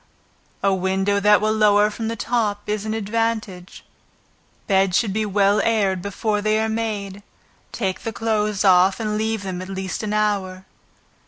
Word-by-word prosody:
A 195 - +3
window 190 +2 0
that 210 +1 +4
will 215 0 +1
lower 210 -1 +4
from 225 +1 -5
the 230 - -2
top 215 -3 -1
is 210 0 -2
an 215 - -2
advantage. 220 -4 -3 0.8
Beds 190 -2 +2
should 210 -5 0
be 215 0 -1
well 200 +1 +2
aired 200 -5 +1
before 205 +2 -2
they 215 +1 +1
are 220 - 0
made, 210 -3 -3 0.5
take 190 -4 -2
the 225 - -4
clothes 210 -1 -1
off, 185 +1 +5
and 215 -1 -2
leave 220 -1 -2
them 185 -2 -5
at 185 - -8
least 190 -1 -4
an 215 -1 -3
hour. 195 -3 -1
205 Hz, 165 wpm, -21 LUFS, 195-220 Hz, 0.8 s, off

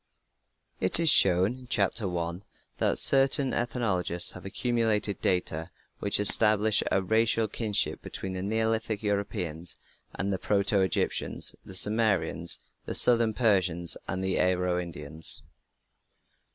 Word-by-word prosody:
It 95 - +4
is 165 -3 +4
shown 100 +8 +2
(Chapter 100 +1 0
1) 85 +1 -5 0.4
that - - 0
certain 135 -1 +3
ethnologists 105 -8 0
have 90 - -12
accumulated 110 -2 -2
data 80 -2 -2 0.3
which 100 - -1
establish 105 +1 +5
a 95 - 0
racial 110 +2 0
kinship 105 -1 -1
between 95 -1 -7
the 95 - -6
Neolithic 110 +1 -3
Europeans, 95 -5 -4 0.4
the 95 -1 -3
proto 100 0 -1
Egyptians, 95 -3 -1
the 95 - -8
Sumerians, 100 -4 +2 0.3
the - - -4
southern 115 -3 +5
Persians, 95 -7 0
and 95 0 -5
the 95 -1 -2
Aryo 90 -1 -1
Indians. 80 -2 -9
100 Hz, 115 wpm, -26 LUFS, 90-110 Hz, 0.4 s, establish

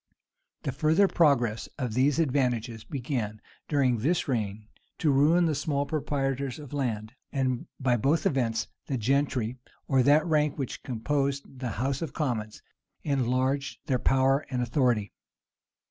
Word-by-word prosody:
The 140 - -1
further 155 +8 +3
progress 125 - +2
of 125 -5 -2
these 135 +4 +3
advantages 125 -7 0
began, 120 -4 -3 0.3
during 130 -6 +2
this 160 +10 +1
reign, 105 -4 -2 0.3
to 155 - +2
ruin 155 +6 +4
the 160 - +1
small 145 0 -1
proprietors 135 -3 -2
of 145 -3 -10
land;[*] 115 -5 -2 0.2
and, 130 -3 -1
by 125 -2 +2
both 140 +9 +1
events, 115 -4 +1 0.2
the 135 - -1
gentry, 130 -1 0 0.3
or 135 -1 +4
that 145 +4 +5
rank 150 -3 +1
which 135 -4 -4
composed 135 +2 -2
the 125 -2 -2
house 130 +5 -1
of 160 -5 -4
commons, 115 -8 -3 0.4
enlarged 135 0 0
their 130 -5 +1
power 135 +3 +3
and 125 -2 -1
authority. 120 -5 +1
135 Hz, 140 wpm, -28 LUFS, 120-145 Hz, 0.4 s, that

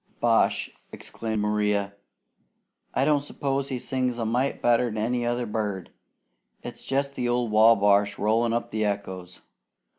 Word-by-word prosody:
"Bosh!" - - +2 0.2
exclaimed 110 -2 -4
Maria. 105 -1 0 1.0
"I 135 - +2
don't 150 -1 +3
s'pose 140 -1 -3
he 130 - -2
sings 125 -1 -2
a 115 - -2
mite 125 +5 0
better 120 +1 +3
'an 110 -2 -5
any 120 +2 -1
other 120 0 -1
bird. 105 -4 -3 0.7
It's - - -8
jest 140 +1 -1
the 125 -3 -2
old 120 -2 0
Wabash 105 -2 +4
rollin' 115 +2 +1
up 120 0 -2
the 110 0 -1
echoes. 95 -3 -4
115 Hz, 145 wpm, -26 LUFS, 105-125 Hz, 1.0 s, Wabash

